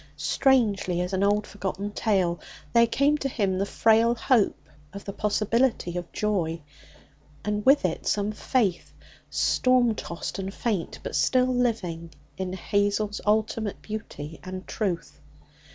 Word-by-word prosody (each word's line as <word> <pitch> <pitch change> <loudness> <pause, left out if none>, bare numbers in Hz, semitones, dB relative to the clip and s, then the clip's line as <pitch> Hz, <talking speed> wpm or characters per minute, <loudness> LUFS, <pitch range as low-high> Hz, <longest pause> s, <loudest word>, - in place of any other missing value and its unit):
Strangely 205 - +2
as 180 +2 -3
an 190 - +1
old 205 +1 +2
forgotten 200 0 -4
tale, 190 -6 +1 0.3
there 235 0 +6
came 285 +5 +2
to 275 - -1
him 195 -6 0
the 200 - 0
frail 225 +2 +4
hope 235 -2 +1 0.3
of 200 - -8
the 200 - -5
possibility 215 -2 +1
of 175 -1 -5
joy. 180 -6 -1 0.9
And 210 0 -1
with 275 -5 +6
it 165 - -2
some 205 0 +1
faith, 210 -4 -1 0.4
storm 255 -2 +3
tossed 170 -3 -5
and 190 0 -3
faint, 205 -5 -2
but - - -4
still 255 0 +3
living, 195 -10 -1 0.3
in 185 -1 -4
Hazel's 205 +2 0
ultimate 215 0 0
beauty 165 -8 -7
and 185 0 -7
truth. 180 -7 -3
205 Hz, 135 wpm, -26 LUFS, 185-230 Hz, 0.9 s, there